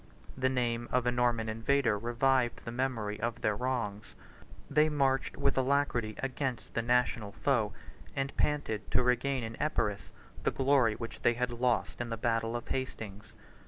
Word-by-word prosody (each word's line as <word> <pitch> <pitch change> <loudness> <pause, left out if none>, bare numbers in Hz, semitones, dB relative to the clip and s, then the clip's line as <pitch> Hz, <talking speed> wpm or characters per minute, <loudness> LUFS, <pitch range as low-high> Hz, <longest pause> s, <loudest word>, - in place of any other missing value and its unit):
70 130 - -12
The 130 - +4
name 120 -2 -1
of 125 -1 +2
a 120 - +3
Norman 120 -2 +1
invader 115 +2 +2
revived 120 +3 +1
the 115 - -4
memory 115 -5 -2
of 115 0 -2
their 105 - +1
wrongs: 105 -4 -3 0.5
they 150 +2 +4
marched 135 -3 +1
with 140 - +2
alacrity 130 -5 +1
against 135 -2 -3
the 115 - +1
national 120 -3 +1
foe, 115 -1 +1 0.4
and 135 0 -2
panted 145 -8 0
to - - +3
regain 125 +1 +1
in 115 0 -5
Epirus 105 -9 0 0.3
the - - +2
glory 135 -5 +3
which 115 +1 -7
they 120 - +3
had 125 0 -1
lost 120 0 0
in 120 - -3
the 115 - -3
battle 115 0 0
of 120 - -5
Hastings. 110 -6 -4
120 Hz, 165 wpm, -31 LUFS, 115-130 Hz, 0.5 s, The